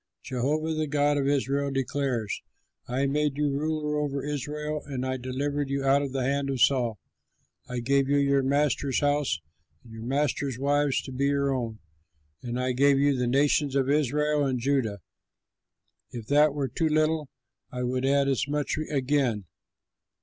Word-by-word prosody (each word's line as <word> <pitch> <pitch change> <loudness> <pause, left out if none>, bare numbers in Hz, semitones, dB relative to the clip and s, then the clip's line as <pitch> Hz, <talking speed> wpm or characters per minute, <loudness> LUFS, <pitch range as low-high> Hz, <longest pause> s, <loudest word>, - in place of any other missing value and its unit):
Jehovah 150 +6 -1
the 155 0 -1
God 145 0 +2
of 135 - 0
Israel 140 0 +1
declares: 135 -5 -2 0.5
'I 130 +3 0
made 145 0 0
you 145 -1 +1
ruler 150 +1 -1
over 140 -2 -2
Israel 150 +1 -3
and 130 -2 -3
I 130 0 -1
delivered 140 +3 -2
you 140 0 -1
out 135 +1 +4
of 140 -2 -3
the 135 -1 -1
hand 140 +1 0
of 135 -2 -2
Saul. 120 -4 +3 0.7
I 125 -1 -3
gave 135 +2 +2
you 145 - +3
your 140 -1 +3
master's 140 -1 +1
house 145 - +1 0.4
and 115 - -14
your 110 - -8
master's 140 +1 -1
wives 145 +1 +1
to 135 - -8
be 135 +2 -1
your 140 -1 +1
own, 115 -4 -3 0.6
and 120 0 -4
I 130 0 0
gave 140 +2 +4
you 140 0 +3
the 125 -1 0
nations 140 +2 +2
of 135 0 +2
Israel 150 +1 +1
and 130 -2 0
Judah. 120 -6 0 1.1
If 120 -3 -7
that 145 0 +4
were 140 -2 -1
too 160 +6 -1
little, 155 -1 +1 0.4
I 125 0 -4
would 125 +1 -1
add 140 +1 +3
as 135 0 0
much 150 +1 -1
again. 130 -7 0
140 Hz, 170 wpm, -27 LUFS, 130-145 Hz, 1.1 s, out